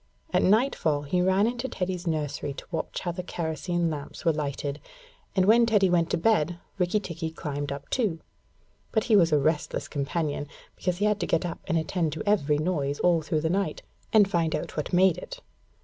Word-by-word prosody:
At - - +4
nightfall 190 - +2
he 180 +5 0
ran 190 +3 +3
into 245 +2 -2
Teddy's 180 -4 -3
nursery 145 -3 -2
to - - -8
watch 165 -2 -3
how 175 - -2
the 180 +2 -4
kerosene 170 0 -2
lamps 145 +3 -7
were 165 - +5
lighted, 145 -1 -3 0.5
and 190 -2 +4
when 230 +3 +6
Teddy 200 -5 +3
went 170 -2 +2
to - - +1
bed 175 -3 +2 0.2
Rikki 180 +3 +2
tikki 170 -4 -5
climbed 145 -3 -4
up 140 0 -6
too; 210 -10 0 0.7
but 220 - +2
he 225 - +3
was 170 -4 +5
a 150 - +5
restless 150 -1 0
companion, 145 0 -2 0.3
because 180 -1 -2
he 205 - +1
had 210 -1 +2
to 175 - -2
get 165 - +1
up 170 - -4
and 165 -3 +1
attend 160 -1 -1
to 155 - -4
every 150 -8 +2
noise 145 -3 -1
all 175 -2 +4
through 155 0 -1
the 160 - 0
night, 190 -4 -1 0.3
and 215 -3 +6
find 165 -4 +1
out 150 - -5
what 150 - -3
made 185 +1 +4
it. - - -9
170 Hz, 200 wpm, -27 LUFS, 150-190 Hz, 0.7 s, when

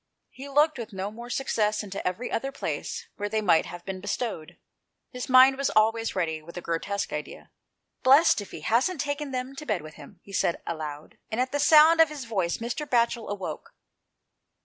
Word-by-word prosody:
He 275 +2 -10
looked 295 0 +3
with 225 -3 -7
no 190 +2 -4
more 235 +2 -10
success 215 -5 0
into 200 -1 -6
every 195 +7 -3
other 270 +4 -2
place - - -4
where 205 0 -3
they 220 +1 0
might 180 -6 +3
havfr 175 0 -9
been 190 -1 -5
bestowed. 205 -5 -4 0.5
His 250 0 -6
mind 260 +1 +7
was 275 - +1
always 225 +1 +2
ready 160 -4 -1
with 170 +3 -12
a - - -2
grotesque 180 +5 -3
idea, 150 0 -7 0.5
"Blest 275 -2 +5
if 200 - -9
he 160 - -9
hasn't 255 - +1
taken 285 +1 -2
them 260 +1 -4
to 300 - -7
bed 200 -7 -1
with 155 0 -10
him," 190 - -14
he 200 - -13
said 175 - +1
aloud, 155 -2 -6
and 220 - -3
at 255 +1 0
the 290 - -1
sound 315 +2 +7
of 325 - +5
his 295 -4 -7
voice 190 -7 -1
Mr. 245 +6 -4
Batchel 235 -1 +1
awoke. 200 -2 -6
225 Hz, 195 wpm, -26 LUFS, 190-270 Hz, 0.5 s, mind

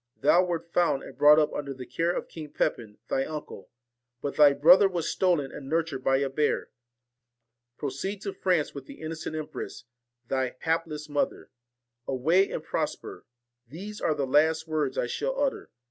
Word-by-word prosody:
Thou 180 - +5
wert 170 -1 -4
found 170 -6 +2
and - - -11
brought 150 +1 +7
up 155 -1 +2
under 140 -2 -4
the 130 -1 -8
care 165 +8 0
of - - -4
King 155 -2 -9
Pepin 110 -6 -2
thy 135 - 0
uncle, 150 -10 -7 0.5
but 140 +3 -4
thy 150 -1 +7
brother 170 +8 +7
was 170 -3 -2
stolen 170 -8 +1
and 135 -2 -9
nurtured 160 -4 -1
by 135 0 +3
a 140 0 0
bear. 145 +2 -1 1.1
Proceed 145 +9 -4
to 200 - -3
France 180 -5 0
with 140 -2 -9
the - - -11
innocent 160 0 -5
empress, 155 -1 -6 0.4
thy 130 -2 -1
hapless 160 -2 -1
mother. 145 -1 -2 0.6
Away, 160 +9 +3
and 155 - -4
prosper! 155 -1 -4 0.4
These 200 - -8
are 155 - +1
the 140 -2 -1
last 160 +4 +2
words 150 -4 -1
I - - +1
shall 265 - -2
utter. 280 -2 -1
155 Hz, 170 wpm, -27 LUFS, 140-170 Hz, 1.1 s, brought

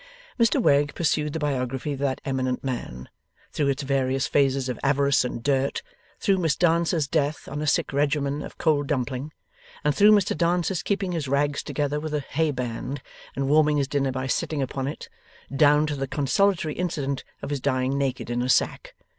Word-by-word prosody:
Mr 230 -3 +4
Wegg 145 +1 +3
pursued 150 -2 0
the - - -2
biography 135 -1 -2
of 135 - -6
that 140 -2 -1
eminent 130 -2 -1
man 120 - -5 0.4
through 145 - 0
its 140 +1 0
various 135 -1 0
phases 135 -2 +1
of 125 - -4
avarice 140 -1 +3
and 120 -2 -4
dirt, 140 0 0 0.4
through 195 -2 +2
Miss 160 -6 +1
Dancer's 170 -3 +2
death 150 0 -1
on 150 +1 -4
a 155 - -2
sick 145 - +1
regimen 145 0 0
of - - -9
cold 145 -3 +1
dumpling, 130 +1 -2 0.5
and 150 0 +2
through 205 +1 +6
Mr 205 -3 +2
Dancer's 175 +1 +1
keeping 195 -2 -1
his 160 -5 -2
rags 145 +1 +1
together 145 0 -2
with 155 0 -4
a 150 - 0
hayband, 135 -3 -2 0.3
and 135 0 -1
warming 150 +1 +4
his 140 -2 +1
dinner 140 -1 0
by 130 0 -3
sitting 140 +2 -1
upon 135 +1 -3
it, 145 - -6 0.5
down 150 +1 +5
to 150 -1 -2
the 135 -1 -3
consolatory 155 +4 +1
incident 145 -6 -2 0.2
of - - -4
his 145 - -1
dying 130 0 0
naked 135 -3 -2
in 120 0 0
a 125 - -1
sack. - - +1
140 Hz, 185 wpm, -25 LUFS, 135-150 Hz, 0.5 s, through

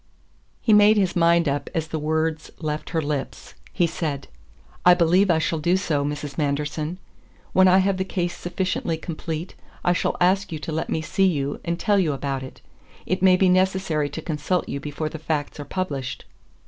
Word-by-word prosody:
He 220 - +3
made 210 +1 +6
his 190 -3 +1
mind 170 -1 +4
up 145 0 -1
as 160 -1 -1
the 160 - -3
words 155 +1 -1
left 155 -1 -4
her 165 -2 -1
lips. 145 -2 -4 0.2
He 175 - +2
said: 150 -4 -3 0.6
"I 180 0 +7
believe 180 +3 +3
I 170 - +4
shall 160 0 0
do 175 +4 +2
so, 155 -7 0
Mrs. 145 0 -4
Manderson. 150 +3 -2 0.6
When 185 0 +6
I 185 +1 +6
have 190 0 +2
the 190 - 0
case 175 -2 -2
sufficiently 175 -2 -2
complete 160 +1 -5 0.3
I 175 - +4
shall - - -1
ask 190 +2 +2
you 160 - -3
to 150 +2 -6
let 160 +1 -2
me 160 - -1
see 195 +4 +2
you 145 -5 -1
and 170 +1 -2
tell 205 +2 +2
you 160 -6 +1
about 135 -1 -3
it. 130 - -10 0.4
It 185 - -1
may 185 -1 +6
be 190 - +4
necessary 185 -5 +2
to 155 +3 -7
consult 165 +2 -1
you 140 - -3
before 150 +2 -4
the 160 - -7
facts 150 -2 -3
are 145 - -5
published." 140 -9 -4
165 Hz, 195 wpm, -23 LUFS, 150-185 Hz, 0.6 s, I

